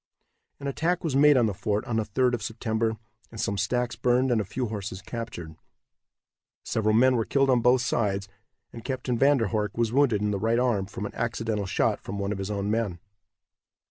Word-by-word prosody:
An 140 - -8
attack 165 +6 -1
was 155 -6 -1
made 145 0 +6
on 120 - +4
the 105 - 0
fort 105 +3 -2
on 120 -4 -2
the 110 - +1
3d 125 +4 +1
of 120 - -1
September, 110 0 -2 0.3
and 115 - -10
some 100 - -1
stacks 120 +5 -1
burned 125 +1 +2
and 115 -3 +2
a - - -2
few 120 +6 -3
horses 100 -4 -5
captured. 105 -9 -7 1.1
Several 110 -1 +1
men 130 +2 +5
were 115 - +1
killed 135 +3 +2
on 125 -2 +3
both 125 +2 +4
sides, 100 -4 0 0.5
and 115 - -9
Captain 130 -1 -2
Van 140 +4 +4
der 115 -5 0
Horck 105 -2 -2
was 115 -1 0
wounded 125 -7 +3
in 105 - +1
the 100 - -1
right 115 +3 +1
arm 120 -6 +1
from 105 +1 -6
an - - -6
accidental 115 -3 -2
shot - - 0
from 100 - -6
one 100 0 -2
of 100 - -3
his 95 +1 -4
own 100 0 -2
men. 110 -6 -1
115 Hz, 210 wpm, -26 LUFS, 105-125 Hz, 1.1 s, made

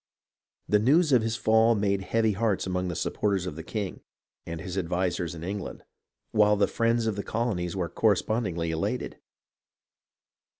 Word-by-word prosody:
The 105 - +4
news 150 +8 +4
of 125 -3 +5
his 115 0 -1
fall 110 +1 +4
made 100 -2 0
heavy 110 +3 +1
hearts 105 -1 0
among 90 0 -1
the 90 - -3
supporters 100 0 -1
of 90 - -5
the 80 - -6
king, 100 +3 -4 0.5
and 85 -1 -5
his 90 +1 -6
advisers 90 -1 -1
in 80 - -8
England; 100 +1 -5 0.5
while 105 -1 +4
the 100 0 +3
friends 115 +2 +1
of 110 -2 0
the 100 - -2
colonies 100 -7 -2
were 90 -3 -1
correspondingly 100 -5 0
elated. 80 0 -3
100 Hz, 160 wpm, -27 LUFS, 90-110 Hz, 0.5 s, of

